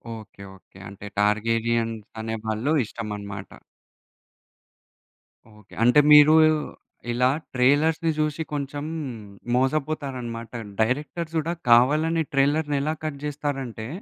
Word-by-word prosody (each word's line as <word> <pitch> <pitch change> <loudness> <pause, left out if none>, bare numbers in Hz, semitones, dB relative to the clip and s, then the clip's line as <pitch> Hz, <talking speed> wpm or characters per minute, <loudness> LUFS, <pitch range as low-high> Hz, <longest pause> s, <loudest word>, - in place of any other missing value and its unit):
Okay, 110 -2 -13
okay. 95 - -21
అంటే 100 +1 -11
Targaryens 115 +1 0 0.2
అనే 110 0 -3
వాళ్ళు 110 +7 -1
ఇష్టమనమాట. 100 -3 -7 2.1
ఓకే. 105 - -20
అంటే 125 +5 +6
మీరు 150 +1 +8 0.8
ఇలా 125 +2 +2 0.3
ట్రైలర్స్‌ని 155 +6 +3
చూసి 155 +1 -1
కొంచెం 145 +1 -4 0.7
మోసపోతారన్నమాట. 130 -4 -2 0.3
డైరెక్టర్స్ 150 +7 -2
కూడా 165 +2 -2 0.2
కావాలని 155 +7 +4
ట్రైలర్‌ని 145 +2 +2
ఎలా 155 +2 -1
కట్ 155 -3 -4
చేస్తారంటే, 135 -6 -4
130 Hz, 95 wpm, -24 LUFS, 115-150 Hz, 2.1 s, మీరు